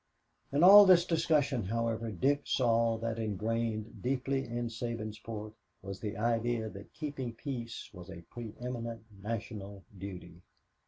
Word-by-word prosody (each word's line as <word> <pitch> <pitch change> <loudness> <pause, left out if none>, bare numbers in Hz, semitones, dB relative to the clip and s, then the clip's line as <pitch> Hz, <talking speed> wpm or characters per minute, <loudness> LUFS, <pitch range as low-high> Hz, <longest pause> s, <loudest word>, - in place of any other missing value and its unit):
In 145 +4 +3
all 200 +2 +11
this 175 -2 +7
discussion, 150 - +2
however, 115 +2 -1
Dick 135 +9 +1
saw 115 -2 +2
that 115 0 -3
ingrained 110 +1 -2
deeply 135 +1 0
in 120 +1 -2
Sabinsport 110 -2 -5 0.3
was 100 0 -6
the 105 0 -4
idea 115 0 0
that 100 -1 -12
keeping 140 -6 -4
peace 120 -2 -5
was 90 -1 -10
a 90 -3 -9
preëminent 115 0 -5 0.2
national 105 -2 -5
duty. 95 -1 -8
115 Hz, 125 wpm, -32 LUFS, 110-125 Hz, 0.3 s, all